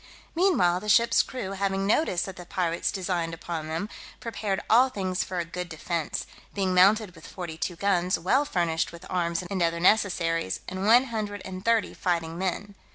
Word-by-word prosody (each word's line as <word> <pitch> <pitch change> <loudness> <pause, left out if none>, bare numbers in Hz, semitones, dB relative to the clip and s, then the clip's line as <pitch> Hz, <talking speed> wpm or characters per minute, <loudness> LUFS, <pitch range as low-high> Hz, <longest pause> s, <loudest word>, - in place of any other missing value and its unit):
Meanwhile, 320 - +3
the 210 - -6
ship's 235 +3 +5
crew 250 -7 -5
having 195 0 -1
notice 200 - +2
that 190 - -6
the 180 - -9
pirates 170 -2 -1
designed 175 -3 -2
upon 165 -1 -5
them, 165 +6 -3 0.3
prepared 210 -4 -2
all 250 +4 +5
things 190 -6 -2
for 185 - -5
a 170 - -1
good 180 +1 -6
defence, 160 0 -3 0.3
being 190 -2 0
mounted 195 +2 +4
with 165 -2 -13
forty 175 -4 -6
two 175 +2 -3
guns, 185 -1 +1
well 220 - +2
furnished 170 - 0
with 170 +1 -11
arms 170 -1 0
and 185 +1 -3
other 170 0 +1
necessaries, 170 - +2
and 190 +2 -3
one 240 +3 +7
hundred 205 -3 -3
and 185 0 -7
thirty 230 -1 +2
fighting 165 -2 -1
men. 190 +2 -2
185 Hz, 180 wpm, -27 LUFS, 170-205 Hz, 0.3 s, one